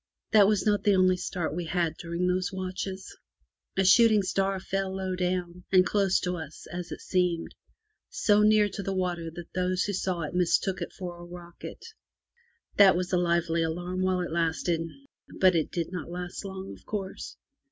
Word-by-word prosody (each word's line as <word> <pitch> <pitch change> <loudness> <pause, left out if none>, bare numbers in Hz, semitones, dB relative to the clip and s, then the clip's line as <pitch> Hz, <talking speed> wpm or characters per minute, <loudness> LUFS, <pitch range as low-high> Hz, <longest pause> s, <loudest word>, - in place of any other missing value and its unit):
That 210 -2 +7
was 210 -2 +1
not 205 -1 +2
the 205 -2 +4
only 185 0 +4
start 175 -3 -3
we 175 0 -3
had 170 -1 0
during 170 +1 -3
those 180 +1 0
watches. 190 0 -5 0.6
A 190 - +3
shooting 215 +1 +6
star 195 +1 0
fell 190 0 -2
low 190 -1 -2
down, 180 -1 -2
and 185 -1 +6
close 195 -2 +2
to 180 0 -2
us 160 - -9
(as 175 0 -5
it - - -6
seemed) 180 -2 0 0.3
— 430 0 -52
so 210 -1 +3
near 210 0 +5
to 205 - -6
the 195 0 -3
water 175 -3 -2
that 170 +1 -10
those 185 0 0
who 205 - -2
saw 185 -2 -1
it 155 - -4
mistook 180 +1 +1
it 170 - -4
for 175 -2 -7
a - - -9
rocket. 175 0 -10 0.9
That 195 -3 +8
was 180 +1 -2
a - - +4
lively 170 -1 +1
alarm 175 +3 -2
while 185 -1 +1
it 175 - -4
lasted, 165 0 0 0.6
but 185 -1 +6
it 160 - +1
did 170 -1 -3
not 180 -2 -5
last 175 +2 -6
long, 190 -1 -7
of - - -15
course. 195 -3 -5
185 Hz, 190 wpm, -28 LUFS, 175-190 Hz, 0.9 s, That